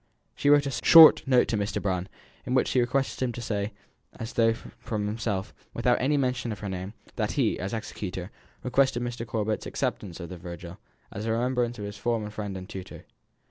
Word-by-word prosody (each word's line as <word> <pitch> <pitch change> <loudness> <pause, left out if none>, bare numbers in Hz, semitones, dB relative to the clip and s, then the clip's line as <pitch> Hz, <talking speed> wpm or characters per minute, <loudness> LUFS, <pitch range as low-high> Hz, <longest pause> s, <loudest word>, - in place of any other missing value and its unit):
She 145 - +1
wrote 145 0 +6
a 140 - -2
short 165 -2 +10
note 125 -2 +4
to 110 - +1
Mr. 100 0 -1
Brown, 95 -2 -2 0.4
in 125 - 0
which 130 - +3
she 130 - +2
requested 130 +3 0
him 130 -2 +1
to - - -7
say, 105 -2 -2 0.4
as 115 - -7
though 115 -1 +4
from 110 -1 -5
himself; 105 -2 -2
and - - -30
without - - +2
any 145 +3 +2
mention 125 -3 0
of 105 - -4
her 100 - -4
name, 95 +3 -5 0.2
that - - -1
he, - - +1
as 95 +2 -3
executor, 100 -4 -5 0.3
requested 125 -1 +2
Mr. 120 -1 -4
Corbet's 110 -1 -2
acceptance 90 -4 -3
of 85 - -7
the 90 - -7
Virgil, 85 0 -9 0.3
as 105 +3 -5
a - - +1
remembrance 120 +1 0
of 105 - -5
his 100 0 -7
former 115 -3 -1
friend 105 -2 -5
and 95 0 -8
tutor. 95 -3 -9
110 Hz, 205 wpm, -27 LUFS, 100-125 Hz, 0.4 s, short